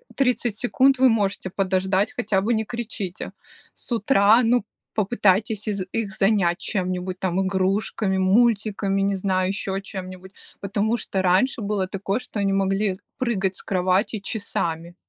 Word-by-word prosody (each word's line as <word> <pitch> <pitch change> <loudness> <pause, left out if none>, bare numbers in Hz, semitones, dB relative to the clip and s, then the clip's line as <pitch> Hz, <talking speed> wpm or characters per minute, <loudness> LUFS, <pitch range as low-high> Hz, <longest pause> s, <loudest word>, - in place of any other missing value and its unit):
30 245 -5 +1
секунд, 265 +3 +3
вы 260 0 +5
можете 200 -4 0
подождать, 190 +2 0
хотя 210 -6 0
бы 230 +4 +1
не 220 0 -1
кричите 215 -6 -5 0.4
с - - -14
утра, 225 -1 +4
ну, 230 -2 +2 0.3
попытайтесь 210 0 +1
из 200 -3 -1
их 210 -4 -3
занять 195 -4 +2
чем-нибудь, 185 -1 -3
там, 190 0 0
игрушками, 190 +1 0
мультиками, 200 0 +2
не 195 0 +1
знаю, 185 -1 0
еще 195 -1 -2
чем-нибудь". 190 -2 -8 0.3
Потому 205 +3 0
что 190 -4 -2
раньше 190 +8 +2
было 200 -2 -1
такое, 195 +3 -2
что 250 -4 -6
они 200 -1 +1
могли 195 0 0 0.2
прыгать 195 -7 0
с - - -6
кровати 185 +3 0
часами. 170 -6 -3
195 Hz, 145 wpm, -23 LUFS, 190-220 Hz, 0.4 s, вы